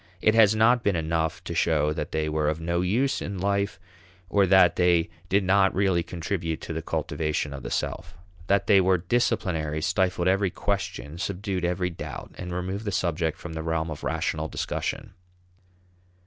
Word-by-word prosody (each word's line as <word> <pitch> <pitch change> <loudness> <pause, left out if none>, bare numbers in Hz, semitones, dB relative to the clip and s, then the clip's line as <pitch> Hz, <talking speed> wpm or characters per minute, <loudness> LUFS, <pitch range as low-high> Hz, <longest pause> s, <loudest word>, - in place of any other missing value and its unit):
It 110 - +3
has 110 -2 +6
not 115 +3 +4
been 100 -4 +1
enough 80 0 -1
to - - -5
show 75 -2 +2
that - - -4
they 80 0 -1
were 75 -1 0
of 80 +1 -2
no 85 +1 -1
use 115 +10 +1
in 100 -1 -4
life 100 +1 -1 0.5
or 100 0 +3
that 95 -1 +6
they 85 -2 +3 0.2
did 100 +1 +3
not 95 +1 +3
really 95 -2 +2
contribute 85 -1 -3
to - - -5
the 80 - -3
cultivation 80 -2 -2
of 70 - -7
the - - -6
self. 85 +2 -3 0.3
That 100 0 +2
they 100 -3 +6
were 95 0 +3
"disciplinary" 85 -6 0
stifled 90 +1 +1
every 95 +1 +2
question, 85 -5 -3
subdued 95 -1 -3
every 90 +1 0
doubt, 85 - -8
and 90 -1 -5
removed 95 +4 -3
the 100 - -1
subject 85 -3 -1
from 85 - -8
the 80 - -4
realm 80 0 -1
of 75 - -7
rational 80 -1 -1
discussion. - - -4
90 Hz, 175 wpm, -26 LUFS, 80-100 Hz, 0.5 s, has